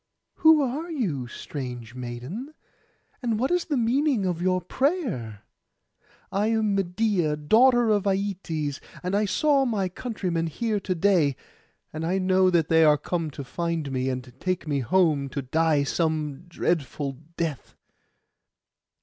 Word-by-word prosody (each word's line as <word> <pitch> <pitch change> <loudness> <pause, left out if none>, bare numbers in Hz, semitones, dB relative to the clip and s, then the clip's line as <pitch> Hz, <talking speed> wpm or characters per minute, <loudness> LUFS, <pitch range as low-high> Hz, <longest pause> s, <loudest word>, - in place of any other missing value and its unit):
'Who 315 -2 +6
are 285 +7 -3
you, 180 - -2
strange 125 -3 -7
maiden? 130 - -6 0.7
and 230 -4 0
what 255 +7 0
is 355 -1 +1
the 295 -4 -1
meaning 245 -1 +2
of 175 -2 -1
your 185 0 +2
prayer?' 180 - -2 0.9
'I 205 +2 +1
am 220 -2 +1
Medeia, 180 -4 +1
daughter 235 - +4
of 205 -2 +2
Aietes, 180 -7 -2 0.2
and 180 +2 -1
I 210 +1 +2
saw 280 +7 +3
my 210 -7 0
countrymen 180 -6 -2
here 215 +6 -1
to 190 -2 -2
day; 165 -6 +3 0.6
and 155 +1 -4
I 180 +4 0
know 185 0 +3
that 170 -3 +2
they 160 0 +5
are 150 -1 +6
come 165 +2 -2
to 140 -1 -7
find 165 +1 -3
me, 130 0 -1
and 125 -1 -5
take 185 -3 -2
me 145 -2 0
home 145 +1 +2
to 140 0 -4
die 155 +2 +2
some 155 0 -1
dreadful 140 -5 -2 0.2
death. 160 -5 -3
175 Hz, 145 wpm, -26 LUFS, 150-215 Hz, 0.9 s, Who